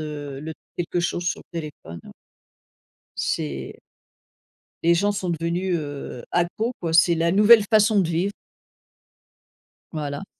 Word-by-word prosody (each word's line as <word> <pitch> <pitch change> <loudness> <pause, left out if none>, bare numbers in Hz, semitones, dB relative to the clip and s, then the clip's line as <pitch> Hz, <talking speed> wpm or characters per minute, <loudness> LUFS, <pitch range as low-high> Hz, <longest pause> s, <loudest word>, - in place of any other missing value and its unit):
heu, 145 -3 -6
le 160 +2 -6 0.2
quelque 175 0 -1
chose 175 0 -2
sur 175 - -1
le 170 - -8
téléphone. 135 - -9 1.2
C'est 70 -3 -3 1.0
Les 170 +1 +5
gens 200 +4 +2
sont 190 -3 -3
devenus, 170 +2 -1
heu, 145 -5 -6
accros, 175 +7 0
quoi, 165 -2 -2
c'est 170 +1 +5
la 165 +1 +1
nouvelle 210 +2 +7
façon 215 -1 +5
de 175 - 0
vivre. 175 +4 0 1.6
Voilà. 150 +2 -4
170 Hz, 125 wpm, -23 LUFS, 150-185 Hz, 1.6 s, nouvelle